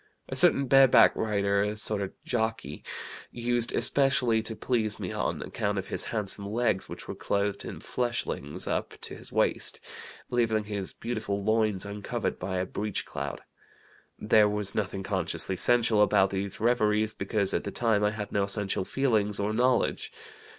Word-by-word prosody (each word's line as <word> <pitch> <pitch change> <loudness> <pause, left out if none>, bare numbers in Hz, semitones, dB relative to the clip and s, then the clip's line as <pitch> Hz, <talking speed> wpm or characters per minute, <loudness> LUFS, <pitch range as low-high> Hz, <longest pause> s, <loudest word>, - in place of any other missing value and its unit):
A - - -4
certain 140 - +5
bareback 135 -1 +6
rider, 100 -2 +1
a 105 +1 -1
sort 105 -1 -1
of 95 - -3
jockey, 110 -1 -2 0.5
used 120 0 +1
especially 135 -5 +3
to 110 0 -6
please 110 -3 -1
me - - -4
on - - -2
account 105 -2 -2
of 95 - -2
his - - -2
handsome 100 -2 -2
legs, 115 -4 0
which - - -9
were - - -4
clothed 100 0 -1
in - - -7
fleshlings 120 - -3
up - - -3
to - - -3
his - - -10
waist, - - +1 0.5
leaving 115 -3 +1
his 100 -2 -4
beautiful 105 -4 -4
loins 110 -2 +1
uncovered 100 0 -4
by 95 +1 -3
a 90 - 0
breech 105 0 -3
clout. - - -5 0.8
There 105 0 +4
was 105 -1 -3
nothing 95 -2 -2
consciously 95 0 -2
sensual 115 +1 +3
about 100 -2 +4
these 100 0 -1
reveries, 110 -2 +2
because 100 0 -1
at - - 0
the - - -4
time 110 -1 +1
I 105 - +4
had 105 -1 -6
no 100 -1 +1
sensual 100 -2 0
feelings 110 -6 +1
or 105 +1 -1
knowledge. 125 +3 +1
105 Hz, 165 wpm, -28 LUFS, 100-115 Hz, 0.8 s, bareback